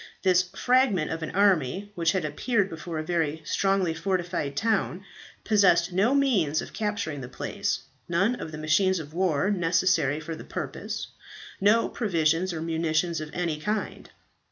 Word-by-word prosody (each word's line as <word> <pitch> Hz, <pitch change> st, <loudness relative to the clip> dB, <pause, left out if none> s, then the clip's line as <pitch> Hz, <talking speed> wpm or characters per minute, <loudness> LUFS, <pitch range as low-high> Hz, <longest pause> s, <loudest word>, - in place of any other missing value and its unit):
This 185 Hz, -2 st, +5 dB
fragment 195 Hz, 0 st, +1 dB
of 160 Hz, 0 st, -3 dB
an 155 Hz, -, -3 dB
army, 195 Hz, -1 st, +2 dB
which 170 Hz, -3 st, +1 dB
had 185 Hz, -5 st, -1 dB
appeared 200 Hz, -, 0 dB
before 165 Hz, 0 st, -6 dB
a 155 Hz, -, -2 dB
very 160 Hz, -2 st, -1 dB
strongly 195 Hz, -1 st, +1 dB
fortified 175 Hz, -5 st, -2 dB
town, 200 Hz, -3 st, 0 dB, 0.4 s
possessed 185 Hz, -4 st, +3 dB
no 215 Hz, +9 st, +3 dB
means 195 Hz, -, +2 dB
of -, -, -7 dB
capturing 205 Hz, -9 st, -2 dB
the 125 Hz, -, -6 dB
place 125 Hz, -, -3 dB, 0.3 s
none 190 Hz, +7 st, +2 dB
of 160 Hz, -, -6 dB
the 155 Hz, -, -7 dB
machines 185 Hz, +5 st, +2 dB
of 155 Hz, -2 st, -7 dB
war 180 Hz, 0 st, +1 dB
necessary 170 Hz, -5 st, +2 dB
for 160 Hz, +1 st, -6 dB
the -, -, -9 dB
purpose, -, -, -5 dB, 0.5 s
no 210 Hz, +4 st, +4 dB
provisions 170 Hz, -4 st, 0 dB
or 160 Hz, -2 st, -4 dB
munitions 165 Hz, 0 st, 0 dB
of 155 Hz, -, -6 dB
any 170 Hz, -4 st, -2 dB
kind. 210 Hz, +6 st, -3 dB
175 Hz, 155 wpm, -26 LUFS, 160-200 Hz, 0.5 s, This